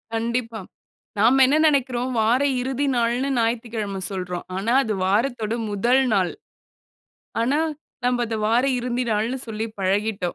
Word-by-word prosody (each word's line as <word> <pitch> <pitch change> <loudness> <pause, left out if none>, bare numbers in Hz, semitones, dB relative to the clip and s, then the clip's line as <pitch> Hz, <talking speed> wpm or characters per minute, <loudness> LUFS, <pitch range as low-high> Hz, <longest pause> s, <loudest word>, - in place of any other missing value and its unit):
கண்டிப்பா. 230 0 -2 0.6
நாம 250 +5 +5
என்ன 290 +4 +3
நெனக்குறோம். 260 -4 +1
வார 240 +5 +3 0.2
இறுதி 265 +2 -1
நாள்னு, 240 +3 +1
ஞாயித்துக்கிழம 225 -4 -2
சொல்றோம். 180 -2 -4
ஆனா, 225 +5 0
அது 220 - -2
வாரத்தோட 225 +2 0
முதல் 240 +6 +2
நாள். 185 -3 +2 1.1
ஆனா, 265 +6 +1 0.5
நம்ப 245 -1 +1
அத, 225 0 -3
வார 240 +3 +3 0.2
இருந்தி 245 0 -2
நாள்னு, 230 +5 -1
சொல்லி 220 +1 -3
பழகிட்டோம். 200 +2 0
230 Hz, 130 wpm, -23 LUFS, 215-250 Hz, 1.1 s, நாம